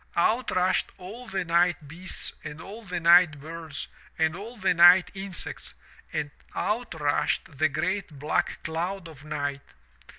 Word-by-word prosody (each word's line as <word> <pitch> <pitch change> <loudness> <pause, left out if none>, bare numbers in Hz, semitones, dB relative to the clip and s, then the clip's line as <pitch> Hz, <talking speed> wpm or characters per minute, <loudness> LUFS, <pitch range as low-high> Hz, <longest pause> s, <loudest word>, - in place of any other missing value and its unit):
Out 225 +8 +2
rushed 185 0 +2
all 210 +7 -9
the 190 -3 -2
night 170 -2 +2
beasts 175 +6 -6
and 150 - -7
all 205 +7 -9
the 180 -3 -3
night 170 -2 +6
birds 160 0 -6 0.3
and 160 0 +2
all 225 +6 -8
the 190 -3 +2
night 175 +2 +7
insects 195 -2 -4 0.4
and 145 -1 -2 0.2
out 220 -3 -1
rushed 145 0 0
the 155 0 +4
great 170 +1 -2
black 150 +3 -1
cloud 170 +3 -3
of 150 -3 -13
night. 145 -2 -3
175 Hz, 145 wpm, -27 LUFS, 155-190 Hz, 0.4 s, night